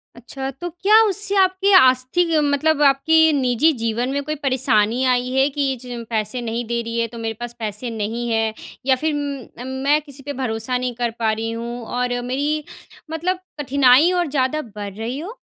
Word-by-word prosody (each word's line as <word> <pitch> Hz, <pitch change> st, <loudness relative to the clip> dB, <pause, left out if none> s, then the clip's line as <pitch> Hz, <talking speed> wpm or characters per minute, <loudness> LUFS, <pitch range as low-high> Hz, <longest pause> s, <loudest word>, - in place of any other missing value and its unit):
अच्छा, 265 Hz, +3 st, -6 dB
तो 310 Hz, +7 st, -6 dB
क्या 400 Hz, +6 st, +4 dB
उससे 405 Hz, 0 st, +1 dB
आपकी 375 Hz, +1 st, +3 dB
आस्थि 260 Hz, +6 st, +3 dB
मतलब 295 Hz, +1 st, +1 dB
आपकी 320 Hz, +3 st, +4 dB
निजी 265 Hz, +2 st, +3 dB
जीवन 230 Hz, +2 st, -1 dB
में 285 Hz, +1 st, -1 dB
कोई 305 Hz, +2 st, -3 dB
परेशानी 255 Hz, -4 st, +1 dB
आई 250 Hz, -1 st, +1 dB
है? 265 Hz, +1 st, +3 dB
कि 275 Hz, -2 st, -1 dB
ज 245 Hz, -2 st, -6 dB
पैसे 220 Hz, +2 st, -2 dB
नहीं 235 Hz, 0 st, -3 dB
दे 235 Hz, 0 st, -1 dB
रही 230 Hz, 0 st, -4 dB
है, 230 Hz, -, +1 dB
तो 235 Hz, +1 st, -11 dB
मेरे 225 Hz, -1 st, -3 dB
पास 240 Hz, 0 st, -6 dB
पैसे 215 Hz, +2 st, -4 dB
नहीं 225 Hz, +2 st, -3 dB
है 225 Hz, -1 st, 0 dB, 0.3 s
या 265 Hz, -1 st, +4 dB
फिर 310 Hz, +4 st, -1 dB, 0.5 s
म 250 Hz, -, -6 dB, 0.2 s
मैं 300 Hz, +1 st, +4 dB
किसी 280 Hz, -2 st, -12 dB
पे 285 Hz, -, -5 dB
भरोसा 250 Hz, -1 st, -2 dB
नहीं 250 Hz, -1 st, -3 dB
कर 240 Hz, -1 st, -1 dB
पा 220 Hz, -1 st, +2 dB
रही 225 Hz, +1 st, -3 dB
हूँ 235 Hz, +1 st, -5 dB
और 245 Hz, 0 st, -1 dB
मेरी 290 Hz, +5 st, -1 dB, 0.5 s
मतलब 355 Hz, +3 st, -1 dB, 0.2 s
कठिनाई 280 Hz, +3 st, +4 dB
और 355 Hz, -2 st, 0 dB
ज़्यादा 275 Hz, +1 st, 0 dB
बढ़ 205 Hz, -2 st, -6 dB
रही 230 Hz, +6 st, -5 dB
हो? 405 Hz, +10 st, -8 dB
255 Hz, 190 wpm, -21 LUFS, 235-300 Hz, 0.5 s, क्या